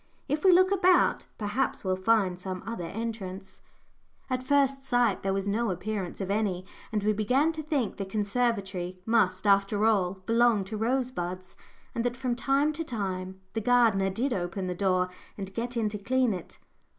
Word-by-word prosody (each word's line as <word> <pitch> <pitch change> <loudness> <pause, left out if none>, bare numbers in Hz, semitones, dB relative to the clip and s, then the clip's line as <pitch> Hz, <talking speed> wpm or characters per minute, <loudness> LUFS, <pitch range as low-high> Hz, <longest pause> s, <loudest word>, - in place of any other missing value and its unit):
If 295 +1 -1
we 380 - +7
look 370 +2 +5
about, 370 -2 +3
perhaps 230 +5 -1
we'll 185 -1 +1
find 190 -2 +2
some 185 0 -5
other 230 -7 -4
entrance." 200 -3 -6 0.7
At 255 0 0
first 275 0 +2
sight 245 -5 +2
there 195 - -1
was 195 +1 -1
no 220 +3 0
appearance 190 0 -3
of 195 -1 -2
any, 200 -4 0 0.3
and 210 -2 -1
we 215 +1 +3
began 255 +9 +2
to 315 -1 -5
think 290 - -1
the 195 - -3
conservatory 200 -3 -1
must, 190 -5 +2
after 200 +1 +3
all, 195 -4 +2
belong 230 -3 +3
to 205 +3 -6
Rosebuds, 205 -6 -2 0.4
and 230 - -1
that 245 0 -1
from 250 -1 -1
time 280 +4 +2
to 330 +2 -3
time 190 - -4
the 225 - -1
gardener 220 -5 +3
did 240 +7 -1
open 185 0 -3
the 180 - -2
door 185 0 +1 0.3
and 195 -1 -6
get 240 +2 -3
in 225 -2 +1
to 210 0 -6
clean 250 +2 +1
it. 180 -3 -8
215 Hz, 175 wpm, -28 LUFS, 190-245 Hz, 0.7 s, we